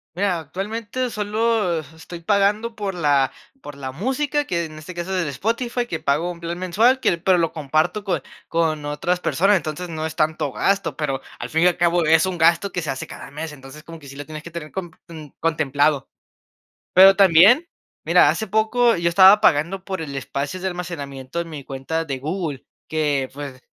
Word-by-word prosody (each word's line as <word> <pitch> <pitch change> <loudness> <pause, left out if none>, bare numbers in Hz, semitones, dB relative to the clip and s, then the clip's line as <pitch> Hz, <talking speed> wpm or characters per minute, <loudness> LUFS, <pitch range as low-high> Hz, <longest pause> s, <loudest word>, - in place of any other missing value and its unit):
Mira, 185 -3 0
actualmente 210 - -4
solo 210 -4 0
estoy 160 +3 -11
pagando 210 +4 +1
por 200 -3 -4
la 145 -5 +2 0.3
por 145 - -9
la 130 -2 -6
música, 270 - -1
que 170 -5 -1
en 155 -1 -10
este 165 +4 -9
caso 175 +2 -4
es 180 - +1
el - - -4
Spotify, 230 - -2
que 160 - -4
pago 155 +6 0
un 170 - -10
plan 170 +1 -5
mensual, 220 +9 +2
que 170 - +1
pero 185 +1 +3
lo 165 -1 +1
comparto 155 +7 -1
con 185 -4 -1 0.3
con 160 -3 0
otras 175 +5 -1
personas. 195 +3 +2
Entonces, 160 +2 -5
no 160 -1 -4
es 160 - -8
tanto 155 -3 0
gasto, 190 -6 0
pero 135 -3 -2 0.2
al - - -5
fin 160 +2 +1
y - - +6
al 180 - +1
cabo 170 -1 +2
es 160 +2 +5
un 185 -2 -3
gasto 170 +4 +3
que 180 - -3
se 155 - -5
hace 130 - -3
cada - - -10
mes. 155 +2 -6
Entonces, 140 +2 -12
como 165 0 -11
que 140 - -14
sí 140 - -10
lo 145 - -7
tienes 155 -1 -8
que 170 - -10
tener 160 -2 -7
com 175 -3 -5
ten 155 -4 -11
contemplado. 150 -3 +1 0.9
Pero 190 +1 +9
también, 200 - +6 0.4
mira, - - +5
hace 220 - -3
poco 220 +2 +2
yo 170 0 +1
estaba 190 +4 +7
pagando 180 +2 +2
por 190 -3 -4
el 140 -3 -5
espacio 140 +5 -4
de 190 - -3
almacenamiento 145 -5 -5
en 165 -1 -6
mi 145 -3 -7
cuenta 140 +5 -3
de 135 -4 -4
Google, 155 -1 -4 0.2
que, 145 -4 0
pues, 140 -3 -8
170 Hz, 200 wpm, -22 LUFS, 150-195 Hz, 0.9 s, Pero